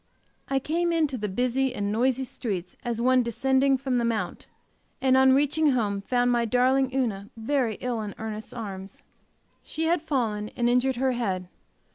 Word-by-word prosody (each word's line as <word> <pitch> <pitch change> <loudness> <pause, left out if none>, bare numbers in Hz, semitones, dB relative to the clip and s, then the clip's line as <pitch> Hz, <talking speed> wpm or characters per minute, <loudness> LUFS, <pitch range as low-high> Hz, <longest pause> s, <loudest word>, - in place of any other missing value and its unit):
I 270 - 0
came 335 +5 0
into 310 -5 +1
the 210 -4 -3
busy 250 +5 0
and 205 -2 -2
noisy 255 +4 +1
streets 195 -8 -5
as 235 -2 -2
one 255 +1 +4
descending 265 +4 +2
from 260 -2 -1
the - - 0
mount, 230 -2 -2 0.5
and 260 -1 +3
on 265 0 +6
reaching 290 +1 +3
home 205 -5 0
found 245 +3 +1
my 240 -1 +2
darling 255 +3 +2
Una 220 -7 -2
very 235 -1 0
ill 245 -3 -2
in 205 -2 -6
Ernest's 220 -1 -6
arms. 195 -4 -8 0.6
She 320 - -4
had 335 0 +2
fallen, 225 -9 -1
and 240 - +2
injured 250 +2 +2
her 260 +2 +1
head. 190 -7 -2
245 Hz, 170 wpm, -26 LUFS, 220-265 Hz, 0.6 s, on